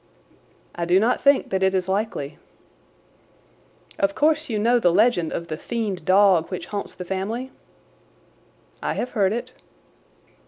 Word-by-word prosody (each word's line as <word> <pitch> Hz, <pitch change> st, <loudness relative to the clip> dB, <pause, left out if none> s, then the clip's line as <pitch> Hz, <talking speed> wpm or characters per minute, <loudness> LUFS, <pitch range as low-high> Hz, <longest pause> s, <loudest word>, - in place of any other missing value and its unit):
"I 170 Hz, -, -3 dB
do 180 Hz, +2 st, +4 dB
not 230 Hz, +4 st, +1 dB
think 280 Hz, -1 st, +3 dB
that 190 Hz, 0 st, 0 dB
it 190 Hz, 0 st, +2 dB
is 185 Hz, -1 st, -1 dB
likely." 190 Hz, -8 st, -3 dB, 1.6 s
"Of 195 Hz, 0 st, +1 dB
course 310 Hz, 0 st, +1 dB
you 220 Hz, -, -1 dB
know 235 Hz, +3 st, +3 dB
the 175 Hz, -6 st, +3 dB
legend 185 Hz, -4 st, +2 dB
of 170 Hz, -, -4 dB
the 155 Hz, -, -5 dB
fiend 205 Hz, -5 st, -4 dB
dog 185 Hz, -3 st, +4 dB
which 185 Hz, -, -5 dB
haunts 200 Hz, -, -4 dB
the 180 Hz, -, -7 dB
family?" 215 Hz, +8 st, -4 dB, 1.3 s
"I -, -, -1 dB
have 250 Hz, -, -3 dB
heard 195 Hz, -4 st, +2 dB
it." 235 Hz, +2 st, -4 dB
195 Hz, 150 wpm, -23 LUFS, 180-235 Hz, 1.6 s, do